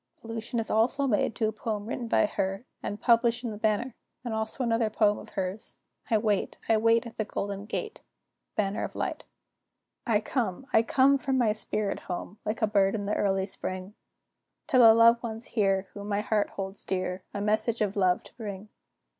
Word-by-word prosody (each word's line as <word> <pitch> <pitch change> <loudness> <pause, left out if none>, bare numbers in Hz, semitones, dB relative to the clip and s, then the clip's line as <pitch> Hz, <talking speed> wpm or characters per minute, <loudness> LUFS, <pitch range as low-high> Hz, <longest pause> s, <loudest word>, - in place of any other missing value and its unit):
Allusion 230 +1 -3
is 225 - -3
also 245 +6 +2
made 220 -3 +1
to 220 - +1
a - - 0
poem 215 -1 -4
written 235 +1 -4
by - - +3
her 195 +2 -2 0.2
and 205 - -4
published 235 0 +3
in 235 - -2
the 210 - -6
Banner, 220 +3 0 0.3
and 235 - -2
also 220 0 -2
to 265 - -1
another 230 -2 +1
poem 210 -1 +2
of - - -11
hers, 190 +2 -4 0.3
'I 225 - +4
wait, 210 -2 0
I 225 - +4
wait 230 +2 +3
at 235 - -10
the 215 - +1
golden 200 -1 -4
gate.'" - - -4 0.5
Banner 205 0 0
of - - -5
Light. - - -3 0.8
I 220 -3 +4
come, 230 0 -2
I 220 - +7
come 270 +4 +4
from 265 -1 0
my 235 -4 +3
spirit 215 -1 -2
home, 185 +3 -6
Like 215 +2 -2
a - - +5
bird 200 -1 +3
in 205 -2 -3
the 205 - -1
early 195 -1 +1
spring, 185 0 -5 0.8
To 255 - +4
the 230 -2 +10
loved 230 +1 +6
ones 225 -1 -5
here, 195 -3 +1
whom 205 0 -7
my 205 0 0
heart 210 -1 +1
holds 195 0 -6
dear, 185 -1 -2
A 205 - -4
message 215 +3 0
of 205 -2 0
love 185 -3 +2
to - - -15
bring. 210 -3 -7
215 Hz, 200 wpm, -28 LUFS, 200-230 Hz, 0.8 s, the